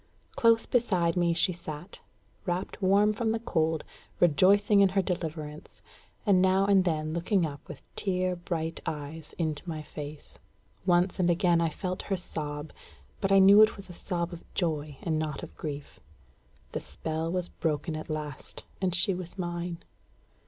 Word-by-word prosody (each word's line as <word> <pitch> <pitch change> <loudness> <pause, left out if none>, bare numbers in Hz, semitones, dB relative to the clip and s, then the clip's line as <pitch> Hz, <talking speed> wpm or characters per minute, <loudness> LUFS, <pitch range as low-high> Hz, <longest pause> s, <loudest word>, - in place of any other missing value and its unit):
Close 230 -1 +4
beside 185 -9 +2
me 175 -1 +2
she 170 +3 +3
sat, 165 0 -8 0.5
wrapped 180 +4 -2
warm 200 +3 +4
from 225 +1 0
the 225 - 0
cold, 160 -7 0 0.4
rejoicing 200 +6 +5
in 195 - +6
her 195 +1 +2
deliverance, 155 -4 -5 0.4
and 195 -4 +5
now 190 +1 +4
and 195 -2 +4
then 155 -2 0
looking 175 +2 +1
up 145 -2 -5
with 150 -6 -9
tear 185 -2 0
bright 165 -2 -3
eyes 150 +1 -6
into 155 -3 -1
my 155 -2 -4
face. 150 0 -9 0.5
Once 180 +2 +3
and 175 -1 +3
again 175 -1 +3
I 165 - +2
felt 180 +3 -4
her 195 - +1
sob, 150 -3 -4 0.5
but 195 -1 0
I 195 - +7
knew 195 +2 +8
it 215 - +5
was 195 -2 -10
a - - -9
sob 175 0 -3
of 170 - -12
joy, 155 -5 -1
and 160 -2 0
not 155 -3 -3
of - - -9
grief. 145 -2 -6 0.7
The - - -2
spell 160 - -4
was 180 -1 -2
broken 155 -1 -2
at 155 - -6
last, 150 -3 -5 0.2
and 180 -2 +1
she 195 +2 +2
was 180 +1 -7
mine. 175 -1 -4
175 Hz, 165 wpm, -29 LUFS, 155-190 Hz, 0.7 s, knew